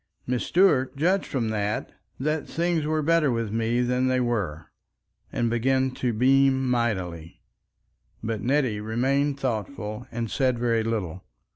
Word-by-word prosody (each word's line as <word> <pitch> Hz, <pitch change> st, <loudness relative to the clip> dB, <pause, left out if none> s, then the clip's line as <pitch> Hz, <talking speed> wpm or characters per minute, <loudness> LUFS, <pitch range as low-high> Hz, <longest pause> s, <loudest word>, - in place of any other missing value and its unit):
Mrs. 125 Hz, -1 st, 0 dB
Stuart 150 Hz, -8 st, +3 dB
judged 180 Hz, +7 st, +1 dB
from 120 Hz, -5 st, -1 dB
that 105 Hz, -1 st, -2 dB, 0.3 s
that 150 Hz, +2 st, -1 dB
things 165 Hz, -2 st, 0 dB
were 155 Hz, 0 st, 0 dB
better 165 Hz, -1 st, +3 dB
with 115 Hz, -4 st, -1 dB
me 115 Hz, +2 st, +1 dB
than 125 Hz, +1 st, +1 dB
they 130 Hz, 0 st, +2 dB
were, 100 Hz, -11 st, -2 dB, 0.6 s
and 120 Hz, -, 0 dB
began 130 Hz, +3 st, +1 dB
to 125 Hz, -1 st, -1 dB
beam 135 Hz, +3 st, +3 dB
mightily. 95 Hz, -10 st, -2 dB, 0.8 s
But 110 Hz, -2 st, -2 dB
Nettie 130 Hz, -5 st, +1 dB
remained 135 Hz, +6 st, 0 dB
thoughtful 115 Hz, -2 st, -3 dB
and 115 Hz, -2 st, -3 dB
said 130 Hz, -2 st, +1 dB
very 115 Hz, -1 st, +1 dB
little. 95 Hz, -6 st, -3 dB
125 Hz, 140 wpm, -25 LUFS, 110-135 Hz, 0.8 s, Stuart